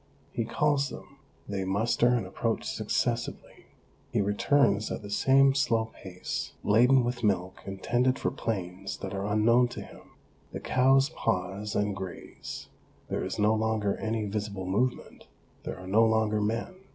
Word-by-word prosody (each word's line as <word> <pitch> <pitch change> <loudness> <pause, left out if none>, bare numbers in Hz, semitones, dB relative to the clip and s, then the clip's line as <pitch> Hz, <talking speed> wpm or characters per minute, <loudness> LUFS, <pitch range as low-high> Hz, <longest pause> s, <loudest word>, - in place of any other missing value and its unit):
He 115 - -1
calls 145 +2 +1
them; 140 +2 -11 0.3
they 100 -2 -2
muster 105 +5 +2
and 120 -4 +2
approach 110 +4 -2
successively. - - -2 0.4
He - - +1
returns 105 +1 +2
at - - -4
the 100 - -8
same 135 +5 +5
slow 115 -4 +1
pace, 90 -1 -5
laden 125 +5 +5
with 120 0 -3
milk 95 -3 0
intended 120 +7 +1
for - - -1
plains 95 -3 -4
that 95 - -6
are 100 +1 -2
unknown 115 +4 +4
to 120 - -7
him. - - -13 0.4
The - - -4
cows 135 +2 +3
pause 95 +3 -2
and 105 -1 0
graze; 95 -2 -7 0.4
there - - -1
is - - -4
no 105 +1 +3
longer 110 -2 0
any 110 -1 -2
visible 100 -2 -3
movement, 120 +7 -2 0.4
there - - -4
are 90 - -10
no 105 +5 +4
longer 110 -1 +2
men. 115 - -1
110 Hz, 150 wpm, -28 LUFS, 100-120 Hz, 0.4 s, same